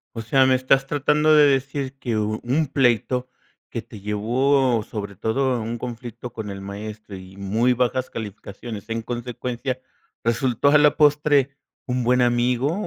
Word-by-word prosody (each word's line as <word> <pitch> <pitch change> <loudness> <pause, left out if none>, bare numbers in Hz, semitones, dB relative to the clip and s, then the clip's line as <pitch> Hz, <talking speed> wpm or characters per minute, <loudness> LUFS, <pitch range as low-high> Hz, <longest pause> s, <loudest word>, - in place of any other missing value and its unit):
O 115 - -3
sea, 130 +4 +3
¿me 130 0 +4
estás 135 +1 +2
tratando 150 +2 +2
de 150 -1 +7
decir 135 0 -1
que 120 -5 -2
u 110 +1 -1
un 140 +5 +1
pleito 125 -1 +1 0.4
que - - -4
te 100 - -13
llevó 120 +3 +1
sobre 100 -3 -6
todo 130 +6 0
a 120 - -1
un 115 +2 -4
conflicto 120 0 -7
con 110 -3 -6
el 100 0 -6
maestro 105 +1 -8
y 95 +1 -12
muy 110 +6 +1
bajas 125 +1 0
calificaciones, 105 0 -8
en 115 0 -3
consecuencia, 125 +2 -4 0.4
resultó 120 +3 +1
a 150 +1 +7
la 150 -1 +4
postre 145 -2 +3 0.3
un 125 -1 -1
buen 125 +1 +3
amigo? 125 +4 +2
125 Hz, 165 wpm, -23 LUFS, 110-135 Hz, 0.4 s, de